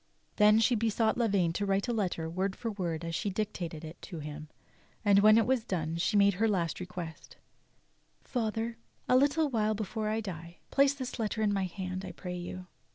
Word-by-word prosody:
Then 210 0 +6
she 225 +2 +4
besought 225 0 +1
Lavaine 200 -8 +2
to 205 - -2
write 195 +2 +1
a 240 - 0
letter 180 -7 -1
w'ord 190 +4 -2
for 230 - -4
word 170 -5 -3
as 165 - -4
she 200 - -1
dictated 185 -6 -4
it 160 +2 -10
to 175 - -8
him, 150 0 -7 0.6
and 200 -1 +6
when 215 +1 +7
that 225 - +5
w'as 255 -2 +1
done 165 -5 -2
she 180 +4 +1
made 200 0 +5
her 225 - +5
last 175 -6 0
request: 180 -3 -7 0.9
"Father, 225 -1 -2 0.3
a 250 - +4
little 285 +4 +4
while 215 -2 +1
before 215 +1 -3
I 220 +1 0
die, 170 -5 -7
place 275 0 +4
this 255 -3 -5
letter 220 0 -1
in 205 -1 +2
my 195 -1 0
hand, 185 0 -5
1 185 -2 -7
pray 180 +1 -6
you. 180 +1 -6
200 Hz, 200 wpm, -31 LUFS, 175-225 Hz, 0.9 s, when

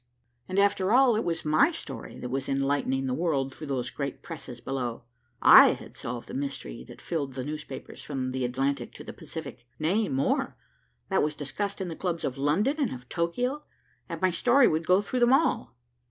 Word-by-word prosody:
And 185 - -3
after 200 -1 +3
all, 250 -1 +6
it 220 - 0
was 165 -2 -2
my 155 - +5
story 335 - -7
that 125 - -4
was 135 +1 -2
enlightening 135 -1 0
the 130 - -1
world 140 -4 0
through 155 - -8
those 130 -2 -2
great 140 -2 -5
presses 135 -7 -8
below. 125 -3 -3 0.4
I - - +9
had - - -11
solved 120 0 -5
the - - -9
mystery 135 - -4
that - - -12
filled 140 -6 -3
the 130 - -3
newspapers 150 -2 -7
from 135 -2 -3
the 130 0 -2
Atlantic 135 +3 -1
to - - -9
the - - -8
Pacific, 135 -7 -8
nay 190 +7 +1
more, 135 +1 0 0.5
that - - +3
was 150 0 0
discussed 195 +9 -3
in 190 - -2
the 165 - -5
clubs 175 -2 -2
of 130 - -2
London 200 - +2
and 275 -6 +1
of 125 -1 -9
Tokio, 245 - -1 0.5
and - - -4
my 185 - +4
story 245 +9 +5
would 160 +1 0
go 185 +2 +5
through 250 +5 -2
them 240 +1 +5
all. 280 - +2
150 Hz, 195 wpm, -28 LUFS, 135-190 Hz, 0.5 s, I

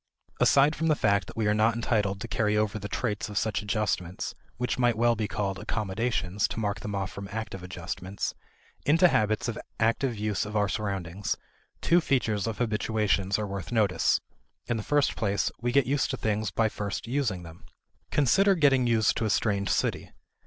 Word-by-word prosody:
Aside 145 +3 +5
from 160 +1 -1
the 155 - +4
fact 100 - +2
that - - -11
we 110 - +1
are 105 - +3
not 110 +2 +3
entitled 105 -4 0
to - - -4
carry 105 -1 +1
over 105 0 0
the 105 - -5
traits 105 -2 -2
of 105 - -5
such 110 -2 0
adjustments 100 -4 -2 0.2
(which 125 +1 -2
might 120 -2 +3
well 120 0 +3
be 105 -1 -2
called 100 -2 -2
accommodations, 105 -2 -1
to - - -5
mark 105 -2 -1
them 105 -1 -4
off 95 -1 -2
from 100 0 -7
active 110 -3 -5
adjustments) 90 +2 -5 0.5
into 165 +4 +5
habits 110 -3 +1
of 115 -1 -3 0.2
active 115 +2 +1
use 105 -1 -1
of 105 +1 -6
our 105 -1 +2
surroundings, 100 -3 -2 0.5
two 175 +1 +4
features 115 - 0
of 110 - -3
habituations 105 -4 +1
are 105 - -2
worth 100 -4 -5
notice. 105 -6 +2 0.5
In 120 -1 -1
the - - -2
first 145 +5 +1
place, 100 -2 0
we 120 0 0
get 140 +1 +4
used 140 +2 +1
to 130 - -2
things 110 -2 -1
by 110 +2 +1
first 105 -2 -4
using 115 -8 -1
them. 85 0 -12 0.5
Consider 195 - +4
getting 135 -6 +4
used 115 -2 +3
to 110 - 0
a - - 0
strange 100 -2 +1
city. - - 0
110 Hz, 190 wpm, -28 LUFS, 100-120 Hz, 0.5 s, Aside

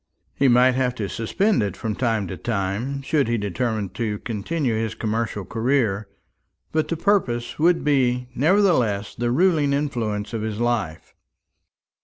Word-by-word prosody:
He 140 - +2
might 125 +1 +5
have 125 -1 0
to 105 -5 -3
suspend 190 - 0
it 100 -3 -2
from 110 -2 -3
time 110 -2 0
to 95 - -4
time, 110 - -2
should 140 -1 +1
he 120 0 +1
determine 105 0 -2
to 110 -2 -3
continue 120 +6 -2
his 110 0 -2
commercial 110 -2 -2
career; 115 -4 0 0.6
but 155 0 0
the 165 - -2
purpose 155 - 0
would 170 +2 +3
be 125 -4 +1
nevertheless 130 - +2
the 120 0 -2
ruling 150 0 +3
influence 115 -7 -2
of 115 - -2
his 110 0 -3
life. 115 -9 -2
120 Hz, 150 wpm, -23 LUFS, 105-140 Hz, 0.6 s, might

